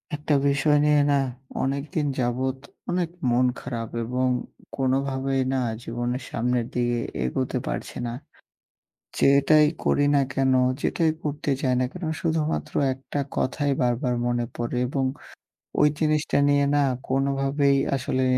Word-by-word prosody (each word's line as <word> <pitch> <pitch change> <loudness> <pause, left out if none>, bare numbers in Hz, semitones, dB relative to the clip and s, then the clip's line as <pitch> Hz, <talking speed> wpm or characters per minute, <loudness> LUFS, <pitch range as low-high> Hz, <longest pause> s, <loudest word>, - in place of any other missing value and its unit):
একটা 150 0 -1
বিষয় 145 +1 +3
নিয়ে 150 -1 +4
না, 140 - +4 0.4
অনেক 140 +1 -1
দিন 150 -3 +1
যাবৎ 130 +2 0 0.3
অনেক 175 -1 0 0.2
মন 120 +1 +3
খারাপ 115 -3 -5
এবং 125 +2 0 0.5
কোনভাবেই 135 0 0
না 135 - +1 0.2
জীবনের 120 +2 -3
সামনের 120 0 0
দিকে 120 -1 0 0.3
এগোতে 65 - -1
পারছি - - -4
না। 115 - -4 1.1
যেটাই 140 +2 +5 0.2
করি 145 - +3
না 140 - +5
কেন, 135 0 +2 0.3
যেটাই 165 -2 +1
করতে 150 0 -3
যাই 130 -3 +2
না - - +2
কেন, 180 - -9 0.2
শুধুমাত্র 160 -2 -1 0.2
একটা 135 +2 -6 0.2
কথাই 145 +2 0
বার, 120 -1 +3
বার, 125 -2 +1
মনে 120 0 0
পড়ে 120 +1 -3
এবং 135 +1 -1 0.8
ওই 150 - +7
জিনিসটা 155 -1 +1
নিয়ে 140 0 +3
না 145 - +4 0.2
কোনভাবেই 135 +1 +2 0.2
আসলে 130 0 -1
135 Hz, 135 wpm, -25 LUFS, 125-145 Hz, 1.1 s, ওই